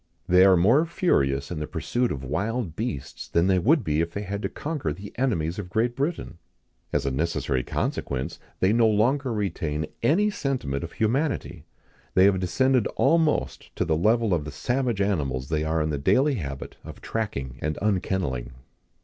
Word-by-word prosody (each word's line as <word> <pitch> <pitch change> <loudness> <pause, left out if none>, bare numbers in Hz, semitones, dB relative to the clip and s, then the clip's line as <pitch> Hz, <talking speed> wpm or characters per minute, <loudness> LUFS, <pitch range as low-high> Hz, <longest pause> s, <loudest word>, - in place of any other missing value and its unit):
They 90 0 +6
are 95 -2 +6
more 120 - +4
furious 70 - +1
in 85 - -3
the 75 - -4
pursuit 120 - -1
of 70 - -4
wild 95 - -2
beasts, 70 - -5
than 85 +1 +2
they 95 -1 +3
would 140 - +3
be 75 +1 +1
if 85 0 -3
they 100 - -3
had 100 +1 -4
to - - -2
conquer 150 - -3
the 95 +7 -8
enemies 95 -9 0
of 95 -3 -6
Great 115 +5 0
Britain. 140 - -3 0.5
As - - 0
a 70 - 0
necessary 70 -2 -1
consequence, 65 +1 -3 0.2
they 95 +3 +4
no 115 -1 +4
longer 125 +6 +2
retain 80 -8 -2 0.2
any 190 - +3
sentiment 125 - -2
of 85 - -7
humanity; 135 +7 -1 0.5
they 95 - +6
have 100 -2 +4
descended 125 +6 +2
almost 160 -2 +1
to - - 0
the 80 -1 +1
level 110 +4 +2
of 80 -3 0
the 75 - -7
savage 120 - -1
animals 70 -10 -1
they 75 -1 0
are 80 0 0
in 75 - -1
the 75 - -2
daily 135 - +3
habit 70 - -5
of - - -10
tracking 70 - -4
and 80 -1 -2
unkenneling." 90 - -1
95 Hz, 180 wpm, -25 LUFS, 75-120 Hz, 0.5 s, They